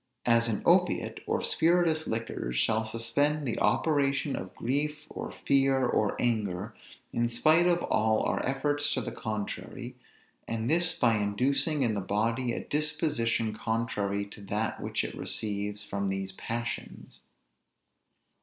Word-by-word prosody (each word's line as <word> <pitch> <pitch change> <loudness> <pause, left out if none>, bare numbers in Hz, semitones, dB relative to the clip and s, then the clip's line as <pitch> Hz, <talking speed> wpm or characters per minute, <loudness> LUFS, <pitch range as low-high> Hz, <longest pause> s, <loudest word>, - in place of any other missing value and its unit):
As 115 -1 +4
an 110 -3 -1
opiate, - - +3
or - - 0
spirituous 165 -1 +2
liquors, 110 - -3
shall 110 - +2
suspend 135 +7 0
the 115 - -1
operation 140 -2 +2
of 95 - -7
grief, 150 +4 -2
or - - -5
fear, 135 -1 +2
or 105 -4 +1
anger, 105 -3 -1 0.4
in 120 0 +1
spite 155 +8 +4
of 175 -1 +2
all 110 0 +2
our - - 0
efforts 145 +2 0
to 130 - 0
the - - -4
contrary; 115 +3 -5 0.5
and 115 0 -2
this 170 +4 +3
by 115 -3 +3
inducing 130 +8 +1
in 115 -3 +2
the 100 - -1
body 115 +6 0
a - - -3
disposition 145 -7 0
contrary 105 -3 -1
to 100 +1 -12
that 105 +3 -2
which - - -1
it - - -4
receives 105 -1 -2
from 100 -1 -3
these 95 0 -2
passions. 120 +4 -5
115 Hz, 140 wpm, -29 LUFS, 105-145 Hz, 0.5 s, As